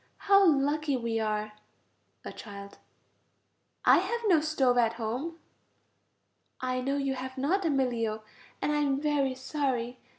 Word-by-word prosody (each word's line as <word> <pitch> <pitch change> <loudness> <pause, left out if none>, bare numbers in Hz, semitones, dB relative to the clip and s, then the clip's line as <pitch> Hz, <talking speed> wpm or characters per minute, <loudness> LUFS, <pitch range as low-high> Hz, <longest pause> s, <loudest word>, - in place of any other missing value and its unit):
How 395 0 +5
lucky 290 -3 +2
we 230 -2 -2
are! 215 -1 -2 0.7
A - - -6
child. 200 -2 -10 1.1
I - - +7
have 470 0 -2
no 350 -7 +4
stove 270 -5 +2
at 230 -1 +3
home. 245 +9 -4 1.2
I 255 0 -2
know 275 +2 -1
you 275 -1 -1
have 260 0 -6
not, 345 +9 0
Emilio, 240 -7 0 0.4
and - - +1
I 300 - +1
am 280 -2 +1
very 285 -3 0
sorry. 260 -3 -2
265 Hz, 135 wpm, -29 LUFS, 235-295 Hz, 1.2 s, I